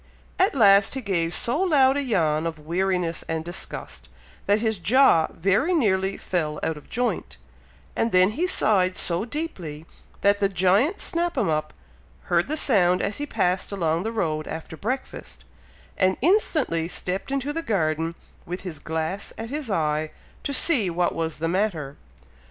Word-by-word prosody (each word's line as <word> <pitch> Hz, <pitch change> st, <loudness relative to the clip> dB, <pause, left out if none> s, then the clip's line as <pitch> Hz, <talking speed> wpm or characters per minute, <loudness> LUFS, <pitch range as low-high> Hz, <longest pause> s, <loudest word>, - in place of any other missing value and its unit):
At 375 Hz, -4 st, +3 dB
last 200 Hz, -2 st, +5 dB
he 265 Hz, -, -3 dB
gave 175 Hz, -6 st, -1 dB
so 240 Hz, -, +2 dB
loud 280 Hz, -8 st, +4 dB
a 285 Hz, -, 0 dB
yawn 165 Hz, -, +1 dB
of 165 Hz, -1 st, -5 dB
weariness 175 Hz, +2 st, -1 dB
and 160 Hz, 0 st, -3 dB
disgust, 65 Hz, -, -7 dB, 0.4 s
that 205 Hz, +1 st, +4 dB
his 220 Hz, -3 st, -1 dB
jaw 200 Hz, -5 st, +4 dB
very 200 Hz, -, +1 dB
nearly 195 Hz, -, +1 dB
fell 155 Hz, -4 st, -2 dB
out 160 Hz, -, -1 dB
of 150 Hz, -, -14 dB
joint, 245 Hz, +1 st, -2 dB, 0.6 s
and 230 Hz, -, 0 dB
then 185 Hz, +2 st, +4 dB
he 340 Hz, +11 st, -1 dB
sighed 190 Hz, -, +2 dB
so 175 Hz, +4 st, +1 dB
deeply, 185 Hz, -, -5 dB, 0.4 s
that 200 Hz, 0 st, +3 dB
the 200 Hz, -1 st, +2 dB
giant 195 Hz, -, +2 dB
Snap 340 Hz, -1 st, -1 dB
'em 220 Hz, -9 st, +1 dB
up 155 Hz, 0 st, -1 dB, 0.6 s
heard 170 Hz, 0 st, +3 dB
the 310 Hz, +3 st, -2 dB
sound 180 Hz, -, +3 dB
as 200 Hz, -, -2 dB
he 290 Hz, -, -3 dB
passed 180 Hz, -4 st, 0 dB
along 165 Hz, -4 st, 0 dB
the 220 Hz, +4 st, -3 dB
road 155 Hz, -8 st, -2 dB
after 160 Hz, 0 st, -7 dB
breakfast, 250 Hz, +10 st, -5 dB, 0.5 s
and 185 Hz, 0 st, +2 dB
instantly 300 Hz, -, +1 dB
stepped 185 Hz, +6 st, -3 dB
into 275 Hz, +1 st, -2 dB
the 330 Hz, -, -2 dB
garden, 165 Hz, -, -1 dB, 0.3 s
with 180 Hz, +2 st, -6 dB
his 175 Hz, -6 st, -7 dB
glass 160 Hz, +6 st, -4 dB
at 225 Hz, +2 st, -6 dB
his 290 Hz, -4 st, -4 dB
eye, 155 Hz, -4 st, 0 dB, 0.3 s
to -, -, -3 dB
see 265 Hz, -, +4 dB
what 175 Hz, +1 st, 0 dB
was 165 Hz, -1 st, -3 dB
the 165 Hz, -, -2 dB
matter. 170 Hz, -6 st, -1 dB
190 Hz, 165 wpm, -24 LUFS, 165-245 Hz, 0.6 s, last